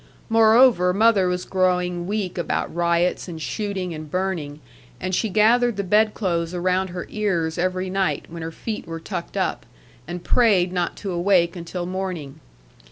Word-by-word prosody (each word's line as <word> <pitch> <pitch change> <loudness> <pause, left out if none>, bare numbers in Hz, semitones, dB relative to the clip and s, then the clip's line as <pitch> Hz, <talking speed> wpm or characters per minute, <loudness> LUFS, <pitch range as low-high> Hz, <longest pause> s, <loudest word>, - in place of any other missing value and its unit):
Moreover, 225 -4 +5
mother 210 -3 +4
was 180 0 -2
growing 180 -2 0
weak 200 -3 -2
about 175 - -2
riots, 170 +2 +1
and 165 -3 -7
shooting, 190 0 -3
and 155 -1 -8
burning; 170 -5 -3 0.4
and 185 +1 -3
she 220 +4 +1
gathered 225 +3 +3
the 200 - -1
bed 210 +3 +3
clothes 170 -4 -1
around 185 +1 +1
her 180 0 -5
ears 175 -6 -1
every 185 +1 -1
night, 190 0 -1
when 170 0 -8
her 165 0 -5
feet 215 +4 -6
were 165 0 -5
tucked 175 +1 -6
up; - - -1 0.4
and 175 +1 -6
prayed 190 -7 +3
not 175 -2 -1
to 195 - -5
awake 175 -1 +2
until 175 +1 -5
morning. 180 -6 -5
180 Hz, 165 wpm, -23 LUFS, 175-200 Hz, 0.4 s, Moreover